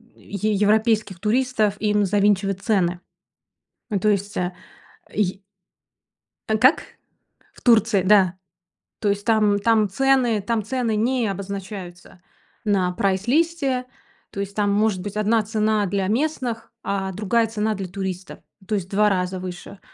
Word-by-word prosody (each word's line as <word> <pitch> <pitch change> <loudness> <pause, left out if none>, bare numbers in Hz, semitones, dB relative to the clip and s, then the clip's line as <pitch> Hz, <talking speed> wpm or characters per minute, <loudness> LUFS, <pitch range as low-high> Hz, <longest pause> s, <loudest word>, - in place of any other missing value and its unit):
е 210 +2 -3
европейских 210 -2 +2
туристов 220 -1 +1
им 210 -1 +2
завинчивать 195 -1 +1
цены. 180 -4 0 0.9
Ну 200 - +1
то 215 - +2
есть, 200 0 -1
э, 180 0 -1 0.6
е 195 -1 -1 1.1
А 220 - +2
как? 255 +8 +4 0.7
В - - -18
Турции. 225 -5 +4
Да. 190 -2 +4 0.6
То 205 - 0
есть 200 0 -1
там, 210 -3 +3
там 215 -1 +3
цены, 250 -2 +2
там 225 +1 -1
цены 235 -1 -1
не 240 +1 +1
обозначаются 190 -2 -7 0.4
на 190 -3 +2
прайс-листе. 255 - 0 0.5
То 200 - -7
есть 200 0 -4
там 205 -1 +1
может 205 -2 +1
быть 205 +1 -6
одна 215 +1 +2
цена 215 -1 +1
для 195 0 -1
местных, 240 -1 -2
а 190 -1 -2
другая 220 +4 +1
цена 215 0 -1
для 195 -2 -5
туристов, 190 0 -6 0.3
то 215 - 0
есть 185 -3 -3
в - - -23
2 210 +1 +3
раза 185 -1 -1
выше. 185 +2 -8
205 Hz, 140 wpm, -22 LUFS, 195-220 Hz, 1.1 s, как